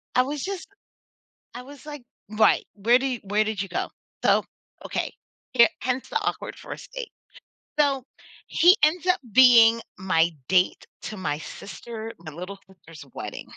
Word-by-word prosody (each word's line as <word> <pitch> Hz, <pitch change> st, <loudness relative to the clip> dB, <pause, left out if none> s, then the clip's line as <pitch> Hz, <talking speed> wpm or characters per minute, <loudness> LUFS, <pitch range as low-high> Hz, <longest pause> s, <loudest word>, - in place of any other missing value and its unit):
I 255 Hz, -, +6 dB
was 280 Hz, +2 st, -3 dB
just, 390 Hz, -1 st, -5 dB, 0.9 s
I 245 Hz, -, -8 dB
was 285 Hz, +2 st, -13 dB
like 295 Hz, -4 st, -8 dB, 0.3 s
Right, 220 Hz, -, +4 dB
where 235 Hz, +5 st, +4 dB
did 270 Hz, 0 st, -1 dB
yo 245 Hz, -, -3 dB
where 210 Hz, +2 st, +2 dB
did 215 Hz, -2 st, -3 dB
you 195 Hz, -, -2 dB
go? 180 Hz, -, -3 dB, 0.3 s
So, -, -, +4 dB, 0.4 s
okay. -, -, -2 dB, 0.4 s
Here 235 Hz, -2 st, +7 dB
hence 255 Hz, 0 st, -2 dB
the -, -, 0 dB
awkward -, -, -3 dB
first -, -, -10 dB
date. -, -, -5 dB, 0.7 s
So 275 Hz, -3 st, +2 dB, 0.4 s
he 355 Hz, +6 st, +5 dB
ends 320 Hz, +3 st, +3 dB
up 365 Hz, -, +3 dB
being 230 Hz, -3 st, +7 dB, 0.2 s
my 170 Hz, -3 st, +2 dB, 0.2 s
date 185 Hz, +1 st, +2 dB, 0.2 s
to 215 Hz, -, -6 dB
my 150 Hz, -5 st, -2 dB
sister 225 Hz, +6 st, -8 dB
my 160 Hz, -2 st, -9 dB
little 180 Hz, +5 st, -7 dB
sister's 165 Hz, -5 st, -14 dB
wedding. -, -, -6 dB
235 Hz, 160 wpm, -25 LUFS, 190-275 Hz, 0.9 s, Here